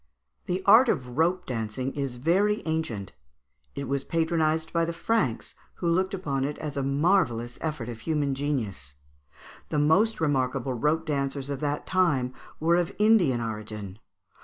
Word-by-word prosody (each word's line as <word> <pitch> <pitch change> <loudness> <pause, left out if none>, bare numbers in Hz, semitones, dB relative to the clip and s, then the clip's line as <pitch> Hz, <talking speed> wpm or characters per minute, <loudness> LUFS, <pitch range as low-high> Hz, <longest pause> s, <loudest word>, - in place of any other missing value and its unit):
] - - -48
The 185 +2 -1
art 230 +5 +7
of 125 - -1
rope 180 +3 +2
dancing 125 +2 -3
is 135 -3 -3
very 190 - +1
ancient; 160 - -2 0.6
it 140 -1 -4
was 135 +1 -1
patronised 160 -1 0
by 170 -1 +2
the 170 0 -2
Franks, 165 - -1 0.2
who 175 - -3
looked 185 +3 +1
upon 140 -8 -2
it 145 +2 -2
as 150 -2 -5
a 140 - 0
marvellous 135 -5 +1
effort 155 -7 -3
of 115 -2 -6
human 145 -1 0
genius. 110 - -3 0.7
The - - -1
most 175 +10 +3
remarkable 135 -4 0
rope 150 +6 0
dancers 140 -2 -2
of 140 - -3
that 145 0 -2
time 150 -9 +1 0.3
were 170 +2 +3
of 175 -2 -1
Indian 205 - +4
origin. 105 -3 -6
145 Hz, 160 wpm, -27 LUFS, 125-170 Hz, 0.7 s, art